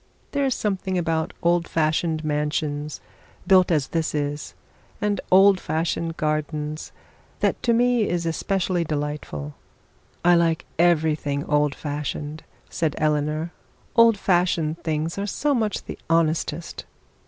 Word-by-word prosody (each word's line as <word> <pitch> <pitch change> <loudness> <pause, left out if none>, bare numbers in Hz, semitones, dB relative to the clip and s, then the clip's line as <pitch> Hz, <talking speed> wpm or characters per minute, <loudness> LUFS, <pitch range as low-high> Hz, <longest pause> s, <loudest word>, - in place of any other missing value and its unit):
There 280 -1 +1
is 265 - +1
something 190 -2 -1
about 165 -2 0
old 170 0 +2
fashioned 160 0 0
mansions, 150 0 -2 0.4
built 185 -2 +5
as 150 -5 +1
this 160 -2 -1
is, 145 0 -3 0.4
and 210 -2 0
old 195 +1 +6
fashioned 165 +1 -2
gardens, 155 0 -2 0.5
that - - 0
to 235 - +2
me 240 -1 +3
is 175 -1 -1
especially 180 +2 0
delightful.' 145 - -4 0.7
'I 175 0 +7
like 165 -1 +1
everything 155 -4 +2
old 150 -1 +1
fashioned,' 150 +1 -4 0.3
said 160 -3 -1
Eleanor; 150 +2 0 0.4
'old 230 -2 +6
fashioned 175 -4 +1
things 160 +3 -2
are 200 - -2
so 290 +8 0
much 220 -5 -1
the - - -7
honestest.' 165 0 0
160 Hz, 125 wpm, -24 LUFS, 150-185 Hz, 0.7 s, I